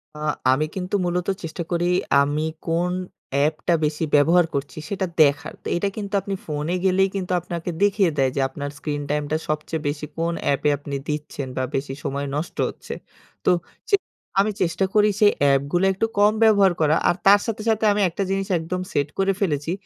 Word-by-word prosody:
আ - - -9 0.3
আমি 150 +4 +2
কিন্তু 185 +2 -2
মূলত 175 0 -1 0.2
চেষ্টা 165 +1 -4
করি 175 0 +1 0.4
আমি 150 +2 0 0.2
কোন 170 +2 +1 0.4
অ্যাপটা 155 +4 +1
বেশি 150 +2 -1
ব্যবহার 165 +4 +5
করছি 140 +2 -4
সেটা 195 -1 -1 0.2
দেখার। 145 +1 +3 0.2
এটা 200 +3 0
কিন্তু 205 -1 -5
আপনি 195 +1 -3
ফোনে 150 +3 -2
গেলেই 190 +1 +3
কিন্তু 185 -1 -3
আপনাকে 170 0 -5
দেখিয়ে 195 -4 +3
দেয় 135 -1 +2
যে, - - 0
আপনার 145 +1 -5
স্ক্রিন 145 -1 -3
টাইমটা 150 +1 0
সবচেয়ে 155 +1 -2
বেশি 145 +1 -2
কোন 170 +1 0
অ্যাপে 145 +1 +1
আপনি 145 0 -6
দিচ্ছেন? 150 -2 -4
বা 130 - +1
বেশি 135 0 -2
সময় 140 +1 -2
নষ্ট 155 +4 -4
হচ্ছে। - - -8 0.5
তো - - +5 0.4
চে 400 - +6 0.5
আমি 210 +1 +1
চেষ্টা 180 +2 +1
করি 210 0 +5
সেই 210 -1 +6
অ্যাপগুলো 140 +6 +3
একটু 210 +4 0
কম 210 +1 +5
ব্যবহার 200 -4 +5
করা। 155 +1 +4
আর - - +2
তার 200 +1 +8
সাথে, 220 -2 -3
সাথে 220 0 +2
আমি 205 - 0
একটা 195 +4 -3
জিনিস 195 0 -1
একদম 180 +3 -3
সেট 145 0 +1
করে 195 0 +3
ফেলেছি। 150 -3 0
165 Hz, 180 wpm, -23 LUFS, 145-195 Hz, 0.5 s, তার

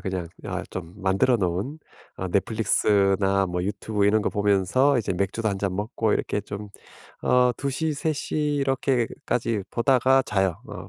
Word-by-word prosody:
그냥 95 -3 -4 0.2
아 - - -3
좀 90 -1 -7
만들어 100 +5 +2
놓은 100 - -2 0.4
어 95 - -4
넷플릭스나 100 -1 +2
뭐 90 0 -2
유튜브 100 0 -1
이런 110 +1 +3
거 - - +1
보면서 105 +7 +2
이제 100 - -1
맥주도 100 +4 -1
1 100 - -2
잔 95 -2 -2
먹고 105 +1 -1
이렇게 105 - -1
좀 105 0 -7 0.5
어 125 0 +4
2:00 140 +3 -2
3:00 155 +1 -2 0.2
이렇게까지 125 -4 -1
보다가 130 +2 +3
자요. 95 -4 0
어 - - -8
105 Hz, 270 characters per minute, -25 LUFS, 95-125 Hz, 0.5 s, 어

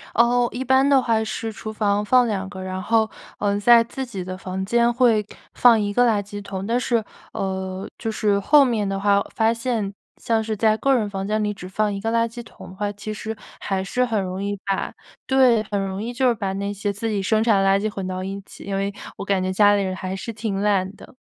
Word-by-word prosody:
哦， 240 +1 +4
一 250 - -4
般 265 +1 +4
的 275 -2 +5
话 225 -2 +1
是 220 +1 -4
厨 215 0 -7
房 205 -1 0
放 250 +3 +4
2 195 -3 -2
个， 190 -2 -8
然 185 0 -4
后， 220 +1 +2 0.3
呃， 205 0 0
在 235 +2 +6
自 265 +3 -5
己 200 -7 -6
的 185 +1 -6
房 190 0 -4
间 235 +3 +3
会 235 -4 +3 0.3
放 235 -2 +6
1 205 -1 -1
个 245 +3 +4
垃 210 -3 +2
圾 205 +1 -8
桶。 195 -1 -5
但 235 +3 +1
是， 235 -3 0 0.3
呃， 190 0 -3
就 225 - -3
是 205 -2 +1
后 285 +8 +6
面 225 -5 0
的 195 0 -2
话 200 0 +3
发 225 0 +3
现， 230 -4 -2 0.2
像 225 -1 0
是 220 0 -2
在 215 +1 +3
个 275 +3 +2
人 220 -4 +1
房 195 -1 -4
间 215 +1 0
里 210 0 -1
只 180 -2 -9
放 210 +2 0
1 195 - -4
个 225 +2 -1
垃 230 0 +2
圾 235 +1 -8
桶 - - -13
的 185 - -12
话， 205 +1 -2
其 205 +1 -6
实 220 +1 -5 0.2
还 190 -1 -2
是 250 +6 0
很 225 -4 0
容 185 +1 -4
易 205 0 -2
把 195 -1 -2 0.3
对， 255 -4 +4
很 205 -1 -2
容 190 +1 -4
易 230 +2 -4
就 255 +1 +1
是 245 - +4
把 200 -4 -3
那 200 +1 -3
些 205 0 -2
自 205 +3 -3
己 205 -2 -1
生 215 +3 +2
产 215 -4 +3
的 195 - +3
垃 195 0 +4
圾 215 +2 -1
混 195 -2 -4
到 185 0 -4
一 195 +1 -5
起， - - -13
因 200 - -3
为 195 +1 -1 0.3
我 - - -5
感 195 -2 +1
觉 185 - -1
家 205 +1 +5
里 200 - +1
人 185 -1 -2
还 185 0 -4
是 230 +4 -6
挺 210 -3 -3
懒 200 -1 +1
的。 - - -15
210 Hz, 260 characters per minute, -22 LUFS, 195-230 Hz, 0.3 s, 在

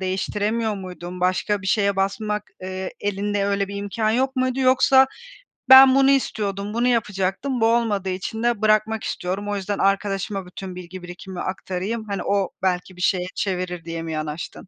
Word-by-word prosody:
değiştiremiyor 210 +4 -1
muydun? 180 -2 -8
Başka 190 +2 0
bir - - -6
şeye 200 -1 +2
basmak, 210 +2 -1 0.2
eee, 185 0 -4
elinde 205 0 -1
öyle 200 -1 0
bir 200 - -6
imkân 205 +2 -1
yok 265 +3 0
muydu? 255 +1 0
Yoksa 260 +1 +5 0.6
ben 265 0 +10
bunu 275 0 +5
istiyordum, 205 -6 -1
bunu 240 +2 +1
yapacaktım 225 +2 0
bu - - +5
olmadığı 225 -5 +1
için 195 +5 -4
de 240 -3 +1
bırakmak 215 0 +2
istiyorum. 195 +3 -3
O 205 - -1
yüzden 200 +1 -3
arkadaşıma 195 0 0
bütün 185 0 -8
bilgi 180 +1 -9
birikimimi 180 +1 -8
aktarayım, 190 +4 -3
hani, 195 -2 -2
o 200 -2 +1
belki 185 0 -1
bir 180 - -10
şeye 180 0 +1
çevirir 180 -3 -3
diye 165 0 -4
mi 165 - -5
yanaştın? 155 +4 -5
200 Hz, 170 wpm, -23 LUFS, 185-220 Hz, 0.6 s, ben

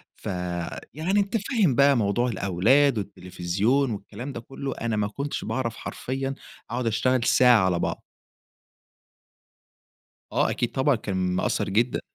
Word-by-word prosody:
فيعني 90 - -3
أنتَ 205 +3 +1
فاهم 200 - +1
بقى 140 0 +5
موضوع 115 +3 +1
الأولاد، 115 +7 +3
والتلفزيون 100 +7 -1
والكلام 110 +6 -6
ده 115 - -5
كله، 135 +2 -6
أنا 115 -2 -1
ما 105 -1 0
كنتش 140 +7 -4
باعرف 115 -3 -2
حرفيًا 135 +1 -4 0.3
أقعد 120 0 -2
أشتغل 125 +3 +1
ساعة 120 -5 +5
على 90 -2 +1
بعض. - - -2 2.3
آه، - - +2
أكيد 120 - -1
طبعًا، 135 0 +2
كان 100 -3 -4 0.2
مأثر 95 - 0
جدًا. 115 +5 +1
120 Hz, 130 wpm, -25 LUFS, 100-135 Hz, 2.3 s, بقى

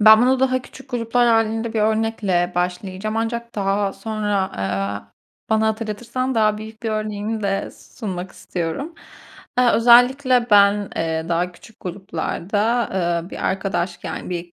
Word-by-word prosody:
Ben 215 +1 +9
bunu 260 +1 +3
daha 255 -1 +2
küçük 265 +2 -14
gruplar 240 0 +2
hâlinde 225 0 +1
bir 220 - +1
örnekle 210 -5 +1
başlayacağım 185 +4 -2
ancak 235 +1 -3
daha 200 0 0
sonra, 215 -2 -2 0.2
aaa, 100 +1 -3 0.4
bana 220 0 +3
hatırlatırsan 230 +4 -2
daha 215 -2 +2
büyük 220 +1 -10
bir 225 - -1
örneğimi 215 0 -2
de 195 0 -1
sunmak 185 -5 -7
istiyorum. 180 - -4 0.6
Eee, 250 -1 +5
özellikle 245 +2 +5
ben, 205 0 +5
eee, 160 0 -1
daha 175 +1 0
küçük 220 +5 -17
gruplarda, 200 +5 -1 0.4
eee, 175 - -12
bir - - -5
arkadaş, 190 -2 -1
yani, - - -5
bir 175 -1 -5
215 Hz, 140 wpm, -21 LUFS, 185-230 Hz, 0.6 s, Ben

